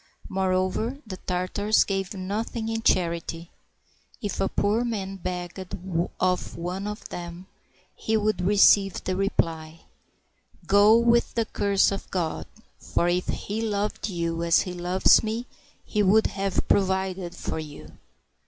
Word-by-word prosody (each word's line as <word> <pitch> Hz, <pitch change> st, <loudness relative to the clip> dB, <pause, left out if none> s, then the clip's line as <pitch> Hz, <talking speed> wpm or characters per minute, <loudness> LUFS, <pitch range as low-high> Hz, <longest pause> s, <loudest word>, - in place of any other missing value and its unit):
Moreover, 190 Hz, +6 st, 0 dB
the 190 Hz, -4 st, -7 dB
Tartars 185 Hz, +4 st, +1 dB
gave 195 Hz, 0 st, -3 dB
nothing 220 Hz, +4 st, -3 dB
in 225 Hz, 0 st, -2 dB
charity. 170 Hz, -3 st, 0 dB, 0.7 s
If 205 Hz, -5 st, -3 dB
a 195 Hz, -, +1 dB
poor 210 Hz, +4 st, +1 dB
man 195 Hz, -5 st, -3 dB
begged 180 Hz, 0 st, -5 dB, 0.6 s
of 180 Hz, 0 st, 0 dB
one 180 Hz, +4 st, -4 dB
of 210 Hz, 0 st, -6 dB
them, 175 Hz, +1 st, -7 dB, 0.5 s
he 220 Hz, 0 st, 0 dB
would 215 Hz, -2 st, 0 dB
receive 195 Hz, 0 st, +4 dB
the 185 Hz, -, -1 dB
reply, 165 Hz, -4 st, -1 dB, 0.4 s
" -, -, -32 dB
Go, 205 Hz, +3 st, +6 dB
with 235 Hz, 0 st, +2 dB
the 230 Hz, -1 st, +1 dB
curse 200 Hz, -2 st, +2 dB
of 195 Hz, -, -5 dB
God; 170 Hz, -4 st, -2 dB, 0.3 s
for 170 Hz, -, 0 dB
if 180 Hz, +1 st, 0 dB
He 215 Hz, +2 st, -3 dB
loved 210 Hz, -1 st, -2 dB
you 170 Hz, -2 st, -2 dB
as 170 Hz, 0 st, +4 dB
He 180 Hz, -, -5 dB
loves 180 Hz, +1 st, +4 dB
me. 225 Hz, +2 st, -3 dB, 0.4 s
He 210 Hz, -, 0 dB
would 210 Hz, +3 st, +4 dB
have 195 Hz, -1 st, -1 dB
provided 190 Hz, -2 st, 0 dB
for 160 Hz, -, -4 dB
you." 150 Hz, -2 st, -10 dB
190 Hz, 140 wpm, -26 LUFS, 180-210 Hz, 0.7 s, Go